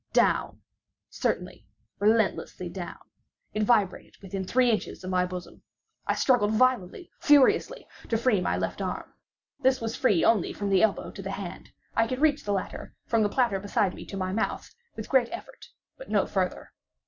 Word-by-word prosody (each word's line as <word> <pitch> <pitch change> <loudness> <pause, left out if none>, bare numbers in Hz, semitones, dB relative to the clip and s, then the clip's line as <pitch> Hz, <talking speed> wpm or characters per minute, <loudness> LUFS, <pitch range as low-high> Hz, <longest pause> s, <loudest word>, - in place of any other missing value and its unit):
Down—certainly, 105 - -2 0.3
relentlessly 205 -4 +1
down! 175 0 -6 0.6
It 215 - -1
vibrated 210 -4 +1
within 195 0 -5
three 245 +5 +3
inches 215 - -3
of 185 - -4
my 180 0 +2
bosom! 180 0 -8 0.5
I - - +2
struggled 235 -5 +3
violently, 255 - +1
furiously, 295 -5 +4 0.2
to 225 - +2
free 225 -4 +2
my - - 0
left - - -3
arm. - - -4 0.5
This 260 -1 +3
was 225 0 -3
free 205 -10 +3
only 220 -5 +3
from 200 -1 -3
the 190 - +4
elbow 220 -2 +1
to 195 - -9
the 195 - -5
hand. 195 -2 -6 0.3
I 225 - +3
could 255 - -2
reach 295 -1 +3
the 205 - -1
latter, 195 -2 -4
from 230 -1 +2
the 210 - +2
platter 235 -5 +1
beside 200 -1 0
me, - - -9
to 195 - -6
my 185 -1 -2
mouth, 220 - -2 0.2
with - - -6
great 255 -3 +3
effort, 350 - -9 0.3
but - - -10
no - - +2
farther. - - -2
210 Hz, 170 wpm, -27 LUFS, 190-250 Hz, 0.6 s, furiously